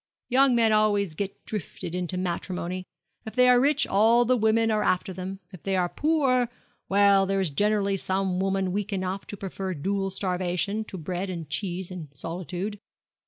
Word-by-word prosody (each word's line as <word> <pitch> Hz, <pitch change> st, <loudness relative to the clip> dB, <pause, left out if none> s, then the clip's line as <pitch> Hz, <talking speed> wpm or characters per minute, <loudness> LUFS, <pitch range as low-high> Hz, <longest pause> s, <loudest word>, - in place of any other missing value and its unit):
'Young 265 Hz, 0 st, +5 dB
men 225 Hz, -2 st, +4 dB
always 205 Hz, -4 st, +2 dB
get 195 Hz, +4 st, -5 dB
drifted 185 Hz, -4 st, -4 dB
into 180 Hz, 0 st, -2 dB
matrimony. 180 Hz, 0 st, -3 dB, 0.4 s
If 220 Hz, -, -8 dB
they 250 Hz, 0 st, +6 dB
are 250 Hz, 0 st, +6 dB
rich 280 Hz, +1 st, +3 dB
all 225 Hz, +4 st, +4 dB
the 255 Hz, +2 st, +3 dB
women 225 Hz, 0 st, +2 dB
are 215 Hz, -1 st, +1 dB
after 185 Hz, +1 st, 0 dB
them, 190 Hz, +2 st, -6 dB
If 180 Hz, -, -10 dB
they 195 Hz, -1 st, -1 dB
are 180 Hz, -1 st, +1 dB
poor 270 Hz, -, +2 dB, 0.4 s
well, 200 Hz, -1 st, +5 dB
there 195 Hz, 0 st, +1 dB
is 185 Hz, -5 st, 0 dB
generally 200 Hz, +3 st, +1 dB
some 190 Hz, -1 st, -1 dB
woman 195 Hz, -1 st, 0 dB
weak 205 Hz, +2 st, -2 dB
enough 190 Hz, 0 st, -3 dB
to 205 Hz, -, -7 dB
prefer 190 Hz, -1 st, -4 dB
dual 195 Hz, +5 st, -1 dB
starvation 185 Hz, +2 st, -1 dB
to 190 Hz, -, -8 dB
bread 180 Hz, +3 st, -4 dB
and 170 Hz, -4 st, -5 dB
cheese 185 Hz, +1 st, -3 dB
and 175 Hz, -4 st, -7 dB
solitude. 180 Hz, +7 st, -5 dB
195 Hz, 175 wpm, -26 LUFS, 185-215 Hz, 0.4 s, they